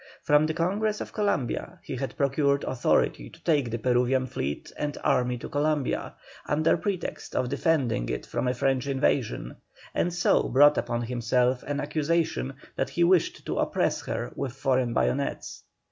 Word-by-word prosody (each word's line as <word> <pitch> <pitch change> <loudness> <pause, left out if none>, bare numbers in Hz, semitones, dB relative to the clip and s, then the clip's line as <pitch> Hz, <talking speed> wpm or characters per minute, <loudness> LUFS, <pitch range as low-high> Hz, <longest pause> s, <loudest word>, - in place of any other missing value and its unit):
From 150 +1 +4
the 160 - -2
Congress 205 +5 0
of - - -6
Columbia 180 - -1
he 140 - -5
had 135 +1 -4
procured 140 0 +2
authority 120 - +1
to - - -18
take 145 -7 +2
the 115 - -2
Peruvian 125 +2 +2
fleet 75 - -4
and 145 -1 -3
army 125 0 +2
to - - -7
Columbia, 145 -1 -1 0.3
under 155 +2 +3
pretext 180 +1 -4
of 125 - 0
defending 140 - +1
it - - -3
from - - -2
a 125 - +2
French 135 0 0
invasion, 135 -3 0 0.4
and 175 - +1
so 175 0 +2
brought 145 +4 +6
upon 120 0 -2
himself 125 +1 +1
an 145 0 -1
accusation 155 -1 0 0.2
that - - -1
he 175 - +1
wished 175 -1 +2
to - - -2
oppress - - 0
her - - -3
with 130 -3 -3
foreign 130 -3 0
bayonets. 140 +4 -1
140 Hz, 160 wpm, -27 LUFS, 125-155 Hz, 0.4 s, brought